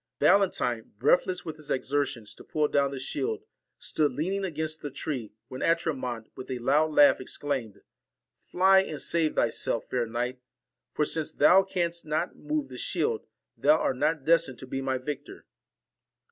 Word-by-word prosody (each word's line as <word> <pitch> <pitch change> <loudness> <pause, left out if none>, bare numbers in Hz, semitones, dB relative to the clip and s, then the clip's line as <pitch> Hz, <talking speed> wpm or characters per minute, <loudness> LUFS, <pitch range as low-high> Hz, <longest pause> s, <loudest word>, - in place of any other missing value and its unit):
Valentine, 125 - +2
breathless 180 - +2
with 160 -1 -6
his 155 -1 -11
exertions 130 -6 -1
to - - -14
pull 150 -1 0
down 140 -1 +2
the 135 - -6
shield, 420 - -3 0.3
stood 150 -3 0
leaning 185 +9 -2
against 155 -3 -3
the 145 - -4
tree, 130 -4 -5 0.2
when 130 - -8
Atramont, 130 -9 0
with 130 - -9
a 130 - -2
loud 145 +6 +2
laugh, 145 -3 +6
exclaimed, 130 -5 -3
4 - - -22 0.7
Fly 190 +1 +6
and 155 -6 -5
save 165 -2 +1
thyself, 115 0 0
fair 120 -2 0
knight; 125 +2 -3 0.5
tor 150 - +2
since 155 0 -1
thou 190 +2 +6
canst 175 -3 -2
not 155 +3 -2
move 305 -1 -3
the - - -8
shield, 450 0 -1 0.3
thou 305 - +4
art 130 - -1
not 155 0 0
destined 165 -5 +3
to 130 - -9
be 135 +1 -4
my 130 -1 0
victor. 140 +2 -7
150 Hz, 165 wpm, -28 LUFS, 130-170 Hz, 0.7 s, laugh